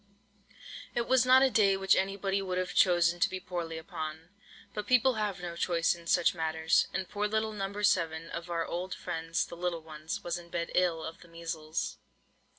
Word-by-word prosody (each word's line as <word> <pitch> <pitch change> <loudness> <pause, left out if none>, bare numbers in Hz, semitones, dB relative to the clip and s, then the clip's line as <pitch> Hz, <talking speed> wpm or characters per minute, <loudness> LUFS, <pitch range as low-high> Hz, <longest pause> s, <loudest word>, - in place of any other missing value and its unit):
It 235 -1 0
was 255 -1 +4
not 260 +1 +7
a 265 - +4
day 200 -4 +4
which 195 0 +4
anybody 195 0 0
would 185 -1 -2
have 185 0 -2
chosen 175 -1 +4
to - - +3
be 185 - -4
poorly 175 -3 -4
upon; 160 0 -6 0.4
but 210 -1 -4
people 255 +1 +5
have 210 -4 -2
no 170 -1 -4
choice 170 -1 +2
in 170 -1 -12
such 175 0 +4
matters, 160 0 +2
and 190 0 -3
poor 210 0 -1
little 220 +1 0
No. 200 0 -4
7, 165 -4 +1
of 170 +1 -6
our 165 -1 -1
old 180 +2 -4
friends 165 0 -2
"the - - -9
little 170 -2 -2
ones," 160 +5 -6
was 175 0 -2
in 170 0 -14
bed 170 0 -3
ill 170 -3 +2
of 160 - -7
the 175 - -14
measles. 165 -1 -4
175 Hz, 195 wpm, -30 LUFS, 165-195 Hz, 0.4 s, not